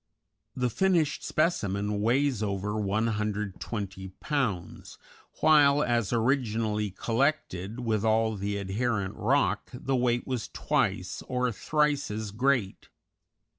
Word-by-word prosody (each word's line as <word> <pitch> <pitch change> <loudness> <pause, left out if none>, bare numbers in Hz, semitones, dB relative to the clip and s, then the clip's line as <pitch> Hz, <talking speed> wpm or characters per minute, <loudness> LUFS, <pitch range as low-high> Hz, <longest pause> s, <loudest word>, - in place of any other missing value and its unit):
The 125 -2 0
finished 170 - +1
specimen 105 - 0
weighs 125 +1 +2
over 100 0 -2
120 105 -2 -2
pounds, 125 - -3 0.4
while 145 -2 +5
as 120 -4 0
originally 115 -4 0
collected, 115 - -1
with 110 -3 0
all 110 0 +2
the 100 +1 -2
adherent 100 0 -1
rock, 135 +7 +1
the 130 +2 -2
weight 120 -1 +1
was 125 -4 -3
twice 105 -11 -1
or 125 -1 0
thrice 150 +4 0
as 105 0 -4
great. 120 -2 0
115 Hz, 105 wpm, -28 LUFS, 105-135 Hz, 0.4 s, while